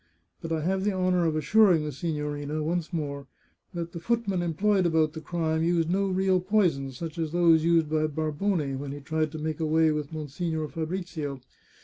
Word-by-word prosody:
But 165 - -6
I 160 -1 0
have 190 +4 0
the 205 0 +1
honour 185 -2 +2
of 155 - 0
assuring 170 +2 +4
the 150 - -3
si 160 +5 -3
gnorina, 150 0 -3
once 170 +2 -2
more, 140 -4 -4 0.5
that 170 -1 -4
the 170 - -6
footman 200 -1 0
employed 185 +3 +2
about 160 -2 +2
the 160 - -7
crime 160 0 -1
used 170 0 +1
no 195 +2 +1
real 190 0 +2
poisons, 175 - +1
such 165 +1 -6
as 160 -2 -1
those 165 -2 +4
used 165 -1 +3
by 155 0 +1
Barbone 155 -1 -1
when 140 0 -5
he 145 - -7
tried 155 +1 -1
to - - -4
make 155 0 -3
away 160 0 +3
with 150 -1 -3
Monsignore 155 +1 -3
Fabrizio. 160 -4 -4
160 Hz, 195 wpm, -27 LUFS, 150-175 Hz, 0.5 s, assuring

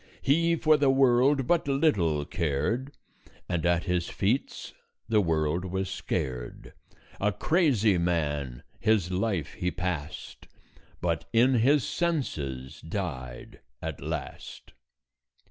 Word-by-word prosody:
He 165 +4 +3
for 155 -1 +4
the 140 -2 +3
world 135 +1 +4
but 170 +1 +1
little 100 - +2
cared, 95 - -2 0.5
And 85 -3 -1
at 85 -1 +2
his 90 -2 -1
feats 115 +8 -1 0.3
the 110 -2 +3
world 80 -1 0
was 95 +1 -3
scared; 60 -8 -4 0.5
A 105 +1 +2
crazy 115 - +2
man 75 -7 -1 0.2
his 105 -4 +2
life 95 -4 -1
he 90 - -2
passed, 90 -5 -5 0.5
But 85 -1 -1
in 120 +3 +4
his 130 +4 +4
senses 75 - -2
died 80 - -6 0.2
at - - -5
last." - - -6
95 Hz, 110 wpm, -28 LUFS, 80-130 Hz, 0.5 s, for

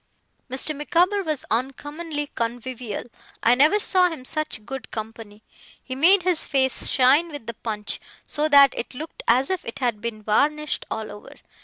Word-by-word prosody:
Mr. 270 +4 0
Micawber 355 +7 +2
was 310 -6 -3
uncommonly 290 +6 -3
convivial. 235 -1 -4 0.4
I 235 - +6
never 300 +11 +4
saw 365 -3 +4
him 310 -7 -8
such 310 -8 -2
good 270 -1 -7
company. 220 -1 -8 0.4
He 260 - -6
made 350 +8 +4
his 360 -3 +3
face 265 -2 +1
shine 275 +6 +4
with 290 -6 -8
the 235 - -5
punch, 210 -2 -4 0.3
so 300 +1 -1
that 280 -2 +7
it 240 - -5
looked 315 +5 -8
as 255 +7 +3
if 375 - -2
it 230 - -7
had 240 -5 -1
been 225 -2 -5
varnished 300 +8 0
all 220 -1 -4
over. 205 - -12
270 Hz, 165 wpm, -23 LUFS, 230-310 Hz, 0.4 s, that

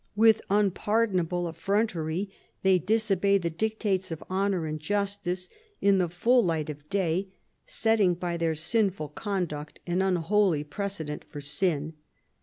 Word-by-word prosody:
With 220 0 +5
unpardonable 195 -3 +1
effrontery 195 -1 -1 0.3
they 190 -1 +5
disobey 200 0 +2
the 170 -3 -2
dictates 200 +1 -1
of 165 -2 -6
honour 190 -3 +1
and 155 0 -3
justice 195 0 -2 0.3
in 200 -1 +4
the 175 -2 +1
full 235 +8 +3
light 160 -4 0
of 150 +1 -13
day, 190 -1 0 0.4
setting 215 -5 +2
by 175 0 -3
their 165 -1 0
sinful 185 -1 0
conduct 160 -5 -4
an 175 +1 0
unholy 185 -2 +2
precedent 160 -2 -5
for 150 - -7
sin. 150 +1 -1
185 Hz, 130 wpm, -28 LUFS, 165-200 Hz, 0.4 s, With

